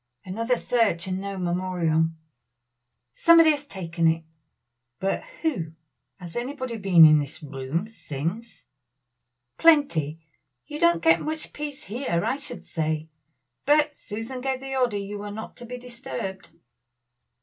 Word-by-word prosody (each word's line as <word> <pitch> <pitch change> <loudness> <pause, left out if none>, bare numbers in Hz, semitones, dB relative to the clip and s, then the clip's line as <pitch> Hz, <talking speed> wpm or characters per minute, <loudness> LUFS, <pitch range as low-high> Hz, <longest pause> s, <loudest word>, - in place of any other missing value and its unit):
Another 230 +6 0
search 225 -9 +1
and 190 0 -3
no 200 0 -5
memorial. 175 -3 +1 1.1
"Somebody 330 - +7
has 290 -1 -3
taken 170 -6 -1
it." 165 0 +2 0.8
"But 195 +1 -1 0.2
who? 175 - -1 0.5
has 175 -3 -9
anybody 255 -1 -3
been 185 -5 +7
in 155 -1 +7
this 145 +2 -6
room 140 +6 -3
since?" 200 +3 -6 0.9
"Plenty. 175 - +4 0.5
You 300 0 -7
don't 340 0 +3
get 325 0 +5
much 310 0 -4
peace 295 0 -6
here, 205 - -2
I 270 - 0
should 290 - -8
say; 155 -1 -2 0.6
but 300 0 +4
Susan 225 +5 -6
gave 265 0 -1
the 270 0 -5
order 245 -5 +1
you 200 +1 -5
were 205 0 -6
not 220 +2 -7
to 240 - -10
be 250 +1 -6
disturbed." 240 -6 -6
205 Hz, 135 wpm, -25 LUFS, 170-265 Hz, 1.1 s, Somebody